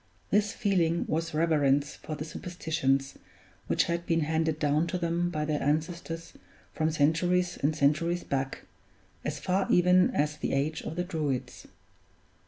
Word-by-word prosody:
This 205 0 +3
feeling 175 -6 +1
was 165 +1 -1
reverence 145 -3 +2
for 155 - -6
the 150 - -5
superstitions 155 -5 -2 0.5
which - - +3
had 170 0 -3
been 165 -1 +2
handed 160 0 0
down 150 +2 +1
to 180 - -2
them 170 0 0
by 155 -3 -2
their 150 -1 -1
ancestors 165 +3 -2 0.4
from 155 -1 +1
centuries 175 +4 +2
and 150 +2 0
centuries 160 +4 +1
back, 135 -1 -3 0.6
as 145 0 -3
far 185 +6 0
even 180 +1 +5
as 150 +1 0
the - - -2
age 145 +3 0
of 160 - -6
the 175 - -1
Druids. 155 -8 -3
160 Hz, 150 wpm, -29 LUFS, 150-175 Hz, 0.6 s, even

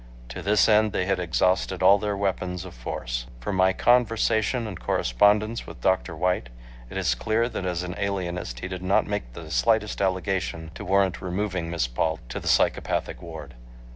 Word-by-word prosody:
To - - -6
this 100 +2 +3
end 110 -1 +4
they 90 - 0
had 95 -1 0
exhausted 90 +2 +1
all 100 +2 +7
their 105 -1 -2
weapons 90 -2 -2
of 95 - -9
force. - - -4
From 95 +11 -3
my 95 0 +4
conversation 115 +1 +2
and 95 -5 -6
correspondence 105 - +2
with - - -10
Dr. 95 -2 +1
White, 90 -6 0 0.4
it - - -6
is 90 -10 +2
clear 110 - 0
that 95 -6 -4
as 90 -1 -2
an 90 0 -4
alienist 90 -10 -3
he - - -3
did 90 -1 -6
not 95 +2 +2
make 100 -13 -4
the 80 +3 -9
slightest 105 - +1
allegation 95 -4 -1
to - - -8
warrant 95 -3 +1
removing 90 -2 -2
Miss 85 -6 0
Paul 80 +7 -1
to - - -4
the - - -8
psychopathic - - +1
ward. 80 -5 -9
95 Hz, 180 wpm, -25 LUFS, 85-100 Hz, 0.4 s, all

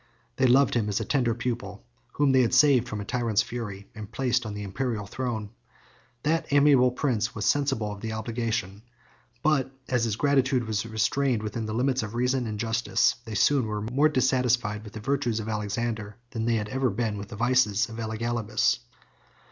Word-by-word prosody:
They 130 - +4
loved 135 +2 +4
him 110 -3 0
as 100 - 0
a - - -3
tender 120 -5 +1
pupil, 120 -5 -4 0.3
whom 145 -2 +3
they 130 -1 +5
had 115 - +2
saved 130 -5 +5
from 110 - -4
a - - -6
tyrant's 115 -2 +1
fury, 105 -5 -6
and 105 -1 -9
placed 125 -3 0
on 105 - -5
the 105 - -5
Imperial 110 +1 -3
throne. 110 -2 -4 0.7
That 160 +1 0
amiable 140 -3 +5
prince 125 -3 -1
was 105 -3 -2
sensible 135 -7 +1
of 100 -1 -8
the 110 - -4
obligation; 110 -3 -3 0.6
but 140 -4 +2 0.2
as 125 -2 +1
his 110 -3 -1
gratitude 135 -1 +2
was 110 0 -2
restrained 115 +2 0
within 110 +1 -3
the 110 - -3
limits 130 +1 +1
of 110 +1 -6
reason 125 0 +1
and 105 -1 -4
justice, 115 +1 +2
they 110 -2 -6
soon 130 +3 +3
were 105 -1 -3
more 135 +7 +2
dissatisfied 125 -6 +1
with 105 - -11
the 110 - -6
virtues 120 -1 0
of 110 - -5
Alexander, 105 0 -3
than 115 -2 -3
they 120 0 +2
had 105 -1 -2
ever 130 +2 0
been 105 0 -2
with 100 - -7
the - - -9
vices 120 -2 +2
of 115 0 -8
Elagabalus. 110 0 0
115 Hz, 190 wpm, -27 LUFS, 105-130 Hz, 0.7 s, they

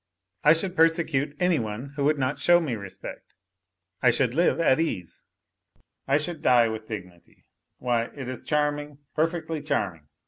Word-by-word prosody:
I 150 - +7
should 180 +3 -1
persecute 160 -4 +2
any 180 -3 +3
one 110 +4 -5
who 145 - -1
would 150 +1 +3
not 130 +1 -1
show 175 0 +5
me 155 -7 -2
respect. 100 -4 -8 0.7
I 125 - +5
should 120 +1 +1
live 170 +4 +2
at 160 -4 +4
ease, 95 - -3 0.9
I 140 +1 +4
should 155 +1 -4
die 120 -2 +5
with 110 0 -6
dignity, 90 -5 -10 0.3
why, 120 -2 0
it 135 +1 -8
is 130 -1 -5
charming, 150 -1 -1 0.2
perfectly 165 -1 -1
charming 95 - -2
140 Hz, 160 wpm, -26 LUFS, 115-160 Hz, 0.9 s, I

